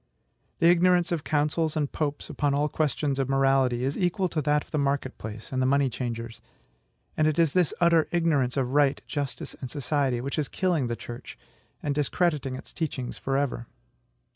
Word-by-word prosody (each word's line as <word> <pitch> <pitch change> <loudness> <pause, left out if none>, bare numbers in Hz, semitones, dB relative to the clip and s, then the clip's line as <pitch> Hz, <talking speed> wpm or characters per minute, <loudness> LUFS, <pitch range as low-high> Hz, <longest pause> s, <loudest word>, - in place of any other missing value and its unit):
The 165 - +4
ignorance 175 0 +3
of 165 -4 -1
councils 155 +1 0
and 145 -2 0
popes 145 -2 -2
upon 145 -1 0
all 145 +1 +2
questions 145 -2 0
of 135 -1 0
morality 135 -2 +2
is 135 +2 -1
equal 180 +1 0
to 155 - -1
that 150 +1 +2
of - - -25
the 150 - 0
market 140 -2 -1
place 110 0 -8
and 130 -1 0
the 130 - +2
money 140 -1 +3
changers; 115 -1 -5 0.7
and 155 - +3
it 155 - +1
is 165 -4 +3
this 180 -4 +3
utter 170 -2 +4
ignorance 150 -7 +1
of 130 -1 0
right, 145 -1 +3
justice, 145 -3 -4
and 130 - -5
society, 140 -3 0
which 135 +5 -3
is 145 - -1
killing 175 -9 0
the 120 - -2
Church, 120 +1 -9 0.5
and 145 - 0
discrediting 150 -2 0
its - - -10
teachings 135 -6 -4
for 135 0 -1
ever. 130 -4 -2
145 Hz, 190 wpm, -27 LUFS, 130-155 Hz, 0.7 s, The